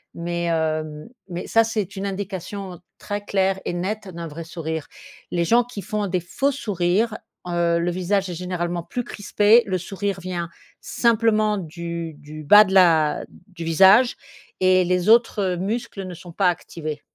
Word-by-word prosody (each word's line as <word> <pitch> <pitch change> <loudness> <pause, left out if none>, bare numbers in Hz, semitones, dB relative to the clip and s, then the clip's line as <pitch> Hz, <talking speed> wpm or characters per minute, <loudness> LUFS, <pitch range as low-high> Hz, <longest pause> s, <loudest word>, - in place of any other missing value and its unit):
mais 170 0 -3
hem, 155 -1 -2 0.2
mais 175 -1 -5
ça 225 - +4
c'est 215 -4 -3
une 195 0 -4
indication 190 -1 -5 0.2
très 205 -1 -4
claire 195 -1 0
et - - -2
nette 195 +4 -3
d'un 170 -2 -7
vrai 160 +2 -7
sourire. 160 -2 -5 0.4
Les 170 -1 0
gens 235 +7 +4
qui 235 -4 -8
font 210 -2 -2
des 185 -1 0
faux 270 +11 -1
sourires, 210 -3 0 0.3
heu, 170 -1 +1
le 175 +1 0
visage 185 +2 0
est - - -4
généralement 175 -1 -3
plus 245 +8 -4
crispé, 210 +2 +3
le 190 -2 0
sourire 195 +2 -4
vient 175 -2 -4 0.3
simplement 220 -2 +2
du 170 -1 -5
du 155 +1 -10
bas 205 +8 +8
de 190 -2 -4
la 165 -5 +4 0.2
du 180 -4 -9
visage 195 +9 +6 0.5
et 185 0 +5
les 180 +2 +1
autres 215 -5 +3
muscles 200 +1 -3
ne 180 - -7
sont 175 +1 -11
pas 185 +3 +1
activés. 155 -3 -5
185 Hz, 165 wpm, -22 LUFS, 170-205 Hz, 0.5 s, bas